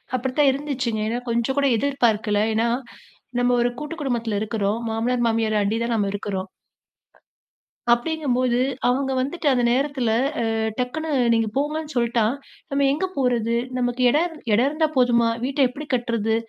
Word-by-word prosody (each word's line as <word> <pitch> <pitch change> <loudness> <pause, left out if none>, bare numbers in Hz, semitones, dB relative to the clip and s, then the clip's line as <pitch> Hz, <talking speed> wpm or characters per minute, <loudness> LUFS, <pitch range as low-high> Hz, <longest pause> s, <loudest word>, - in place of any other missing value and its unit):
அப்படித்தான் 260 +3 +2
இருந்துச்சுங்க. 265 -5 -2
ஏன்னா, 230 +2 -1
கொஞ்சம் 235 +3 0
கூட 280 0 +3
எதிர்பார்க்கல. 225 -6 +1
ஏன்னா, 225 +2 +1 0.7
நம்ப 245 0 +2
ஒரு 240 - +2
கூட்டு 300 +2 -5
குடும்பத்துல 235 -6 -1
இருக்குறோம். 215 0 -1
மாமனார், 240 +2 0
மாமியார 225 -1 +1
அண்டி 210 +3 0
தான் 235 0 -1
நாம 205 -2 0
இருக்குறோம். 195 -2 -4 1.4
அப்டீங்கும்போது 255 -2 0 0.3
அவங்க 265 +2 +1
வந்துட்டு, 290 +5 -2
அந்த 250 -2 +2
நேரத்துல 265 -2 0 0.4
அ - - 0 0.3
டக்குனு 310 +6 -2 0.2
"நீங்க 225 -1 +1
போங்கன்னு 300 +2 -2
சொல்லிட்டா, 235 -1 +2 0.5
நம்ப 280 0 +1
எங்கே 310 +7 -1
போறது? 240 -4 +1 0.2
நமக்கு 245 0 -1
இடம் 325 +5 +1 0.2
இரு - - +3
இடம் 240 +5 +3
இருந்தா 310 +2 +1
போதுமா? 240 -2 +4 0.2
வீட்ட 275 +2 -2
எப்படி 290 +5 -8
கட்டுறது?" 230 -3 0
245 Hz, 145 wpm, -23 LUFS, 225-280 Hz, 1.4 s, போதுமா